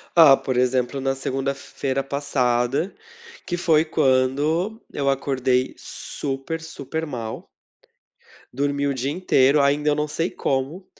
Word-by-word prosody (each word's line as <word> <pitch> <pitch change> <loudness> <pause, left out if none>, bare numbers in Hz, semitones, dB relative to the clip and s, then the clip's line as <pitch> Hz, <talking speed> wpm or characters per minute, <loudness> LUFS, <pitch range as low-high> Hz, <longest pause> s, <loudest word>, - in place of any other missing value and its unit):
Ah, 155 -5 +8
por 130 -2 -3
exemplo, 125 +1 +1
na 135 0 0
segunda-feira 135 0 -3
passada, 135 +2 0 0.5
que 175 - -1
foi 160 -3 +3
quando 150 - +1
eu 140 -1 0
acordei 130 -2 0
super, 140 +3 -5
super 160 0 -5
mal. 115 -5 -6 1.1
Dormi 140 +1 0
o 140 - 0
dia 130 +2 -2
inteiro, 150 -4 +3
ainda 145 +2 +2
eu 145 - +2
não 150 0 -1
sei 165 +4 -1
como, 140 +8 -2
140 Hz, 125 wpm, -23 LUFS, 130-150 Hz, 1.1 s, Ah